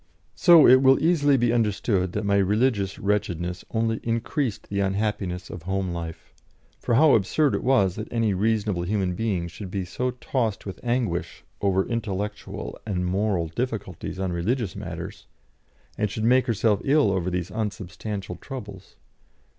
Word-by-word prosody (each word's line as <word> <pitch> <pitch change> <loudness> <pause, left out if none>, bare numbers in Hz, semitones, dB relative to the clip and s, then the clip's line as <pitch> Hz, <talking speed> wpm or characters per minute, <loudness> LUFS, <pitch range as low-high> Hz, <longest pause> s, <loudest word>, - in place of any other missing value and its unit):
So 170 -4 +7
it 130 +1 +7
will 135 0 +5
easily 145 -4 +3
be 120 -1 +2
understood 105 -5 +1
that 105 0 -2
my 100 0 +3
religious 100 0 +1
wretchedness 90 -4 -1
only 115 0 0
increased 115 +1 -2
the 100 - -2
unhappiness 95 -2 -2
of 85 -1 -8
homelife, 90 -4 -4 0.5
for 120 - 0
how 150 +2 +6
absurd 135 +8 +2
it - - -1
was 100 -8 +3
that 110 - -5
any 115 -3 +1
reasonable 105 -2 0
human 95 0 0
being 95 -4 -1
should 90 +3 -8
be 95 -1 -3
so 125 +8 -2
tossed 120 -3 -2
with 95 - -7
anguish 120 -8 -2 0.2
over 95 -1 +2
intellectual 105 - -4
and 95 -4 -2
moral 95 -2 0
difficulties 110 -2 -4
on 95 -2 -2
religious 105 +4 -1
matters, - - -7 0.7
and 105 - +1
should 110 +2 -4
make 125 +3 +4
herself 110 -3 +2
ill 140 -6 +3
over 90 -2 0
these 90 0 -3
unsubstantial 105 -1 -4
troubles. 100 -8 -9
105 Hz, 150 wpm, -25 LUFS, 95-115 Hz, 0.7 s, So